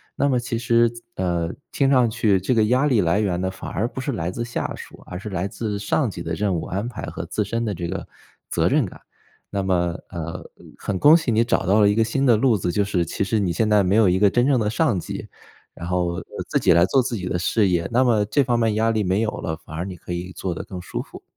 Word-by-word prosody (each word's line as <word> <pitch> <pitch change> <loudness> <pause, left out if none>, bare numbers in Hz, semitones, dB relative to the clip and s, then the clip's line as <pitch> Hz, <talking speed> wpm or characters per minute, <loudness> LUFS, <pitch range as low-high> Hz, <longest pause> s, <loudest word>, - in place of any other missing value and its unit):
那 140 - +1
么 130 - +2
其 120 -1 -3
实， 115 -1 +3 0.2
呃， 85 -2 -1 0.2
听 135 -1 +2
上 125 -3 +4
去 110 -4 +2
这 95 - +1
个 110 -3 +3
压 125 +6 +2
力 125 -7 +3
来 85 +2 +2
源 90 -4 0
呢 95 - 0
反 95 - -8
而 115 +4 -1
不 130 - -8
是 140 - -2
来 85 -8 -2
自 120 +6 -4
下 120 - -3
属， - - -12
而 90 - -6
是 100 +3 -7
来 95 0 -2
自 105 0 -4
上 110 +3 0
级 - - -7
的 - - -4
任 105 -2 0
务 80 - -3
安 100 +6 -3
排 - - -8
和 - - -5
自 - - -1
身 115 0 -2
的 105 - -1
这 85 0 -4
个 95 +2 -4 0.4
责 - - +1
任 - - +3
感。 - - -10 0.5
那 100 -1 -1
么， 90 -2 0
呃， 85 0 -6 0.3
很 95 -2 -3
恭 150 +2 +8
喜 155 -7 -1
你 115 +1 +3
找 115 - 0
到 100 +4 +4
了 105 -1 +5
一 105 - +1
个 115 - +3
新 125 +5 -1
的 120 -4 +6
路 120 0 +3
子， 90 -1 -1
就 100 +3 +1
是 95 -3 0
其 90 - -2
实 105 +3 0
你 95 -4 0
现 110 +6 +1
在 105 -1 +4
没 95 +2 +2
有 110 -3 +5
一 90 - +2
个 105 0 +5
真 120 +5 +2
正 135 -3 +3
的 105 - 0
上 115 - +1
级， - - -6 0.5
然 85 - -8
后， 90 -1 0
呃， - - -5 0.2
自 - - +1
己 - - +3
来 85 +1 +5
做 135 +7 +3
自 120 -1 -3
己 95 -4 -4
的 90 -1 -1
事 100 +4 +2
业。 85 -2 0
那 125 +2 +4
么 115 -5 +3
这 140 +7 +2
方 120 -2 +1
面 115 -2 +1
压 110 +1 +2
力 110 -1 0
没 95 +3 +1
有 110 - 0
了， 80 -1 -4
反 80 - -9
而 85 +3 -3
你 95 -2 -6
可 90 - -7
以 90 +1 -5
做 90 - -3
得 80 - -6
更 95 - -7
舒 90 - -5
服。 - - -12
105 Hz, 300 characters per minute, -22 LUFS, 90-115 Hz, 0.5 s, 恭